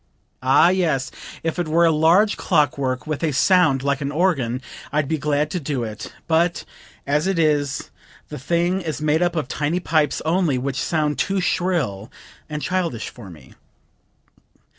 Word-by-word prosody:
Ah, 130 Hz, +6 st, +5 dB
yes! 160 Hz, -9 st, 0 dB, 0.3 s
if 165 Hz, +2 st, -2 dB
it 175 Hz, -, -1 dB
were 165 Hz, +2 st, +3 dB
a 165 Hz, -, +4 dB
large 170 Hz, +7 st, +4 dB
clock 150 Hz, -3 st, +1 dB
work 130 Hz, -2 st, -2 dB
with 155 Hz, -2 st, -3 dB
a 160 Hz, -2 st, +1 dB
sound 150 Hz, -3 st, +3 dB
like 140 Hz, 0 st, 0 dB
an 140 Hz, 0 st, -2 dB
organ 145 Hz, -8 st, 0 dB, 0.3 s
I'd 150 Hz, -1 st, 0 dB
be 160 Hz, +1 st, -1 dB
glad 150 Hz, +1 st, 0 dB
to 180 Hz, -, -2 dB
do 140 Hz, -5 st, -3 dB
it; 110 Hz, -1 st, -7 dB, 0.2 s
but 170 Hz, +1 st, +1 dB, 0.4 s
as 150 Hz, +5 st, +1 dB
it 195 Hz, -2 st, 0 dB
is 145 Hz, -4 st, 0 dB, 0.4 s
the -, -, -7 dB
thing 175 Hz, +7 st, 0 dB
is 155 Hz, -5 st, -4 dB
made 155 Hz, +2 st, +1 dB
up 175 Hz, -1 st, +1 dB
of 155 Hz, -6 st, -2 dB
tiny 150 Hz, +5 st, -1 dB
pipes 155 Hz, -4 st, +1 dB
only, 165 Hz, -4 st, +1 dB
which 135 Hz, +1 st, -2 dB
sound 150 Hz, -4 st, -1 dB
too 195 Hz, 0 st, 0 dB
shrill 155 Hz, -, -1 dB, 0.4 s
and 150 Hz, -1 st, -4 dB
childish 180 Hz, -10 st, -2 dB
for 115 Hz, -6 st, -12 dB
me." 75 Hz, -6 st, -15 dB
155 Hz, 170 wpm, -21 LUFS, 140-170 Hz, 0.4 s, Ah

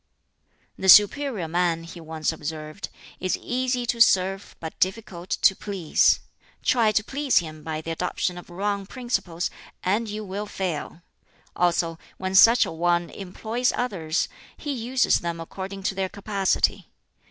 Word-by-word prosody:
"The 190 Hz, -, +1 dB
superior 210 Hz, -, +6 dB
man," 170 Hz, 0 st, 0 dB
he 165 Hz, +1 st, -10 dB
once 160 Hz, -1 st, -2 dB
observed, 155 Hz, +2 st, -6 dB, 0.3 s
"is 185 Hz, -, 0 dB
easy 250 Hz, 0 st, -1 dB
to 235 Hz, -1 st, -1 dB
serve, 195 Hz, -2 st, +3 dB
but 160 Hz, -1 st, -7 dB
difficult 185 Hz, -2 st, -2 dB
to 195 Hz, -, +4 dB
please. 190 Hz, -7 st, +2 dB, 0.4 s
Try 230 Hz, -4 st, +3 dB
to 215 Hz, 0 st, +1 dB
please 275 Hz, +3 st, 0 dB
him 155 Hz, -3 st, -1 dB
by 155 Hz, 0 st, -4 dB
the 165 Hz, -, -5 dB
adoption 180 Hz, +1 st, -2 dB
of 175 Hz, -, -14 dB
wrong 200 Hz, +2 st, -2 dB
principles, 195 Hz, -10 st, -2 dB, 0.3 s
and 210 Hz, +5 st, 0 dB
you 210 Hz, +1 st, -5 dB
will 200 Hz, +2 st, -4 dB
fail. 175 Hz, -4 st, -4 dB, 0.5 s
Also, 170 Hz, -1 st, +1 dB, 0.2 s
when 185 Hz, 0 st, -3 dB
such 230 Hz, +5 st, +7 dB
a -, -, -5 dB
one 175 Hz, +1 st, 0 dB
employs 220 Hz, +6 st, -2 dB
others, 175 Hz, -10 st, -1 dB, 0.3 s
he 295 Hz, -, -4 dB
uses 255 Hz, 0 st, +2 dB
them 170 Hz, -1 st, -4 dB
according 190 Hz, +3 st, -7 dB
to 195 Hz, -, 0 dB
their 190 Hz, -1 st, -2 dB
capacity. 200 Hz, -1 st, 0 dB
190 Hz, 145 wpm, -25 LUFS, 170-215 Hz, 0.5 s, such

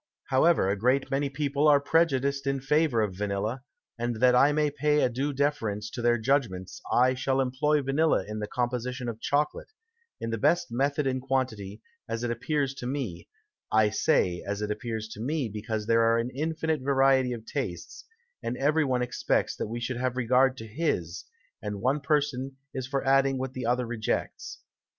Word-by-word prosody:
However, 140 Hz, -, +4 dB
a 100 Hz, -, +1 dB
great 125 Hz, +6 st, +1 dB
many 140 Hz, +1 st, 0 dB
People 140 Hz, +1 st, 0 dB
are 145 Hz, -1 st, +6 dB
prejudiced 140 Hz, -3 st, +1 dB
in 135 Hz, 0 st, 0 dB
favour 140 Hz, -2 st, +2 dB
of 100 Hz, -3 st, -2 dB
Vanilla, 105 Hz, +5 st, -2 dB, 0.4 s
and 120 Hz, 0 st, -1 dB
that 125 Hz, +3 st, +4 dB
I 135 Hz, +4 st, +5 dB
may 150 Hz, 0 st, +1 dB
pay 150 Hz, 0 st, +2 dB
a -, -, +3 dB
due 135 Hz, +5 st, -2 dB
Deference 130 Hz, -7 st, -1 dB
to 120 Hz, -, -5 dB
their 120 Hz, 0 st, +3 dB
Judgments, 110 Hz, -7 st, -1 dB
I 130 Hz, +1 st, +4 dB
shall 130 Hz, +1 st, 0 dB
employ 140 Hz, +3 st, +1 dB
Vanilla 150 Hz, +4 st, +2 dB
in 105 Hz, 0 st, -5 dB
the 105 Hz, -, -3 dB
Composition 125 Hz, +1 st, -2 dB
of 115 Hz, -1 st, -5 dB
Chocolate, 150 Hz, +1 st, 0 dB, 0.5 s
in 115 Hz, -, -3 dB
the 115 Hz, -, -2 dB
best 170 Hz, +1 st, +2 dB
Method 140 Hz, +4 st, 0 dB
and 130 Hz, -1 st, 0 dB
Quantity, 115 Hz, -6 st, -2 dB, 0.3 s
as 115 Hz, +1 st, -3 dB
it 120 Hz, -, -1 dB
appears 135 Hz, +3 st, -1 dB
to 125 Hz, -2 st, -6 dB
me; 125 Hz, -11 st, -4 dB, 0.4 s
I 110 Hz, -1 st, +4 dB
say, 90 Hz, -4 st, +1 dB
as 100 Hz, +1 st, -3 dB
it 105 Hz, -, -2 dB
appears 110 Hz, 0 st, -4 dB
to 105 Hz, -, -9 dB
me, 140 Hz, +1 st, -1 dB
because 110 Hz, +1 st, -4 dB
there 115 Hz, +1 st, +3 dB
are 115 Hz, 0 st, +4 dB
an 115 Hz, +2 st, -1 dB
infinite 155 Hz, +1 st, -1 dB
Variety 135 Hz, -1 st, +3 dB
of 115 Hz, -2 st, -8 dB
Tastes, 95 Hz, -, -5 dB, 0.4 s
and 125 Hz, -, -3 dB
every 150 Hz, +3 st, +2 dB
one 130 Hz, -3 st, 0 dB
expects 125 Hz, -, 0 dB
that -, -, -3 dB
we 115 Hz, +2 st, -4 dB
should 120 Hz, +1 st, -3 dB
have 130 Hz, 0 st, -1 dB
regard 130 Hz, +2 st, +3 dB
to 110 Hz, -, -7 dB
his, 105 Hz, -, -2 dB, 0.4 s
and 105 Hz, -1 st, -4 dB
one 130 Hz, +7 st, +1 dB
Person 140 Hz, -2 st, -1 dB, 0.2 s
is 130 Hz, -1 st, -4 dB
for 135 Hz, 0 st, -2 dB
adding 135 Hz, 0 st, +3 dB
what 130 Hz, 0 st, -4 dB
the 125 Hz, -3 st, -4 dB
other 125 Hz, +1 st, +1 dB
rejects. 115 Hz, -2 st, -3 dB
130 Hz, 185 wpm, -27 LUFS, 115-140 Hz, 0.5 s, are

